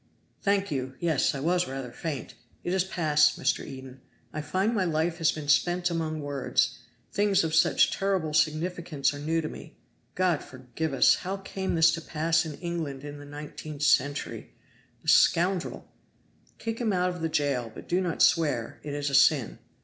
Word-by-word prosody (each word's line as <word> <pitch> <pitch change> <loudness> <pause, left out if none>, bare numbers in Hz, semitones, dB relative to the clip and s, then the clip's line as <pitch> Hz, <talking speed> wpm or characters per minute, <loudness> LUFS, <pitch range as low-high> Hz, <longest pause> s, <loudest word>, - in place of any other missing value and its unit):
"Thank 200 -2 +1
you! 130 -2 -3
Yes, 160 -5 +1
I 135 - -4
was 175 +4 +1
rather 135 -2 -6
faint. 145 +1 -5 0.3
It 175 - -2
is 190 -1 +2
passed. 155 -5 +2
Mr. - - 0
Eden, 130 -1 -10 0.3
I 155 - -3
find 190 +9 0
my 200 -4 +1
life 165 0 0
has 165 - +3
been 150 -2 -7
spent 175 +4 +2
among 160 -2 -2
words 145 -2 0 0.3
things 205 -3 +2
of 160 -1 -2
such 160 - +4
terrible 190 -6 -1
significance 155 -1 0
are 145 - -7
new 160 +3 0
to 155 - -4
me. - - -10 0.4
God 180 -4 +1
forgive 130 +4 -5
us! - - +5
how 190 +2 -4
came 195 -1 -3
this 165 0 +5
to 165 - -3
pass 160 +1 0
in 150 - -6
England 160 -6 -4
in 145 0 -8
the 145 - -10
nineteenth 150 0 -7
century? 145 -1 0 0.5
The - - -17
scoundrel!" 180 +1 +3 0.7
"Kick 225 +1 -4
him 220 -4 +1
out 180 0 +1
of 180 -1 -8
the 165 - 0
jail, 140 -7 0
but - - -11
do 180 +2 +1
not 175 -4 +1
swear; 145 -7 +2
it 145 -1 -5
is 145 -1 -2
a - - -7
sin. 140 -2 +4
160 Hz, 180 wpm, -27 LUFS, 145-175 Hz, 0.7 s, us